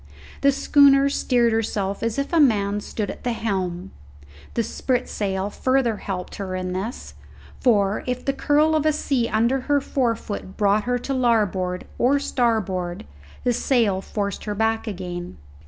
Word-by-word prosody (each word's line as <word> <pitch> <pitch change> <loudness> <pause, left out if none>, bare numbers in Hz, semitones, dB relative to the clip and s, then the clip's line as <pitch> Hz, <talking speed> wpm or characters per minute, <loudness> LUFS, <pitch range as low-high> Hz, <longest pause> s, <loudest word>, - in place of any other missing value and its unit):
The 280 - +5
schooner 280 0 +5
steered 240 -4 +2
herself 205 -3 -1
as 230 +1 -1
if 280 +4 -2
a 335 - +4
man 205 -7 +3
stood 205 0 -4
at - - -12
the 245 - 0
helm. 190 -5 -3 0.6
The 230 - +1
spritsail 205 -6 -2
further 255 -3 +1
helped 185 -3 -5
her 190 -2 -4
in 185 0 -3
this, 200 +7 -5 0.5
for, 205 -5 +2
if 250 0 -3
the 275 - +1
curl 295 +3 +2
of 310 0 +2
a 310 - +3
sea 265 -5 0
under 235 +5 +2
her 285 +2 +1
forefoot 230 -8 -2
brought 205 0 +2
her 245 0 +1
to 270 +3 -4
larboard 205 -8 +1
or 265 +4 +4
starboard, 200 - -1 0.4
the 245 - +2
sail 230 -6 +1
forced 200 -1 -4
her 210 -1 -3
back 225 +2 0
again. 180 -3 -6
225 Hz, 155 wpm, -23 LUFS, 195-255 Hz, 0.6 s, The